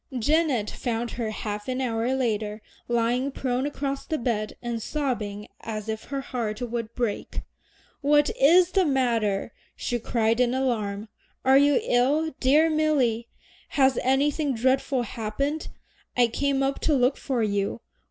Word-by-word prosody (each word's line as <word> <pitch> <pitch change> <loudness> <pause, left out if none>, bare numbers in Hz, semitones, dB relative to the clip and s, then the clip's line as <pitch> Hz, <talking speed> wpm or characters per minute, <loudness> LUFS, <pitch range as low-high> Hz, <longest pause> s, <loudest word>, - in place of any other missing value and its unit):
Janet 280 -3 +2
found 235 -1 -3
her 230 -3 -3
half 210 -1 -5
an 255 0 -2
hour 240 0 0
later 215 -4 -1 0.2
lying 240 +3 +1
prone 260 0 -1
across 275 -1 -3
the 315 - -2
bed, 225 -4 -2
and 235 -2 -4
sobbing 220 -8 -3
as 215 -1 -5
if 220 0 -4
her 275 -1 -3
heart 230 -5 -3
would 235 -2 -4
break. 235 -5 -2 0.6
"What 295 +1 +4
is 345 +6 +5
the 385 -1 +3
matter?" 235 - +1 0.2
she 240 - -2
cried 225 0 +1
in 250 0 +2
alarm. 220 -5 -1 0.4
"Are 265 +1 +7
you 285 -1 +4
ill, 290 +6 +2
dear 295 +5 +5
Milly? 285 -8 +1 0.5
has 265 -2 +4
anything 280 +2 +1
dreadful 260 +2 +1
happened? 250 +8 -3 0.5
I 245 - +6
came 275 +3 0
up 270 0 0
to 305 - +2
look 255 +1 +3
for 255 -5 -1
you. 205 +1 -1
250 Hz, 145 wpm, -26 LUFS, 225-275 Hz, 0.6 s, Are